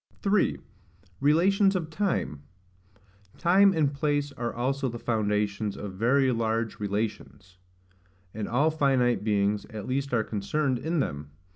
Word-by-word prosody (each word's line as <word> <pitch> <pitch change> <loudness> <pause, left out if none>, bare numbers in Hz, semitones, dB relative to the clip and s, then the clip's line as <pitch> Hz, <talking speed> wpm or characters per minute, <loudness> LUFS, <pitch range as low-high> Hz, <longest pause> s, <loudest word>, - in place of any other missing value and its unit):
3. 200 0 +2 0.6
Relations 190 +7 +3
of 165 -3 -3
Time. 160 - -1 1.0
Time 195 +3 +5
and 155 -5 +1
place 145 0 -1
are 120 -3 -4
also 135 +2 -1
the 120 - -6
foundations 105 -2 -1
of 100 -2 -6
very 130 +7 +2
large 115 -1 -1
relations; 100 -3 -4 0.7
and 105 -1 -4
all 145 +6 +2
finite 130 -7 +2
beings 105 -1 0
at 105 -2 -7
least 140 +2 -2
are 115 -3 +2
concerned 125 +6 -1
in 160 +2 -1
them. 70 - -4
125 Hz, 130 wpm, -27 LUFS, 105-150 Hz, 1.0 s, Time